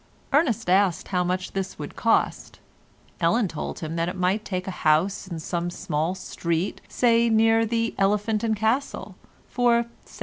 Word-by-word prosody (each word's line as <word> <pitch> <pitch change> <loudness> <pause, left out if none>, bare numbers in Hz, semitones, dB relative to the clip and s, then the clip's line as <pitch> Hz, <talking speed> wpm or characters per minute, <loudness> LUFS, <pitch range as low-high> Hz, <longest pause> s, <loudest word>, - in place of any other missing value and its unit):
Ernest 255 - +2
asked 185 -2 +2
how 180 -2 +1
much 180 +1 -2
this 190 0 -4
would - - -7
cost. - - 0 0.6
Ellen 205 +6 +2
told 160 -3 -6
him 160 +1 -4
that 165 0 0
he 180 - -3
might 185 +3 0
take 185 -2 -4
a - - -2
house 175 +6 +2
in 170 -3 -5
some 175 +2 -3
small 160 0 -2
street, 170 0 -3
say 235 -1 +3
near 225 0 +4
the 230 0 0
"Elephant 210 +2 +1
and 220 -1 +1
Castle," 225 +6 -1 0.3
for 235 -1 +2 0.2
17s. - - -14
195 Hz, 165 wpm, -25 LUFS, 175-225 Hz, 0.6 s, near